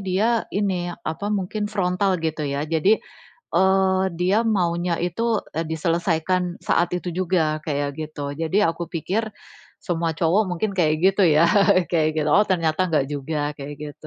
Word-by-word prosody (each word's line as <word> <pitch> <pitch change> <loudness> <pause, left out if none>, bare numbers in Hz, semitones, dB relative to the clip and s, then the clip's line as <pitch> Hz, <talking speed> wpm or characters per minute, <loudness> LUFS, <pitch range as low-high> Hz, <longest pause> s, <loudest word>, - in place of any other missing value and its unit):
dia 205 +5 +1 0.2
ini, 190 -4 -1 0.2
apa, 160 +6 -3
mungkin 205 +3 -3
frontal 185 -1 +1
gitu 155 -1 -2
ya. 140 +1 -2
Jadi, 165 +7 +3 0.6
eee, 190 +1 +3 0.2
dia 185 +4 +3
maunya 175 -5 0
itu, 220 +6 0 0.2
e - - +1
diselesaikan 170 +2 0 0.3
saat 175 - +3
itu 180 - -5
juga, 160 -4 0
kayak 145 -2 -1
gitu. 145 -2 -5
Jadi 165 +3 -1
aku 170 +1 -3
pikir, 195 +7 -1 0.6
semua 170 -3 -1
cowok 175 +6 +3
mungkin 180 +4 -1
kayak 155 -3 +3
gitu 195 +1 +4
ya, 165 - +6 0.5
kayak 160 -3 +2
gitu. 150 - 0
Oh, 210 - +6
ternyata 165 -2 +1
enggak 150 -5 +1
juga, 145 +1 -3
kayak 145 +1 -7
gitu. 150 +1 -9
175 Hz, 155 wpm, -23 LUFS, 155-190 Hz, 0.6 s, ya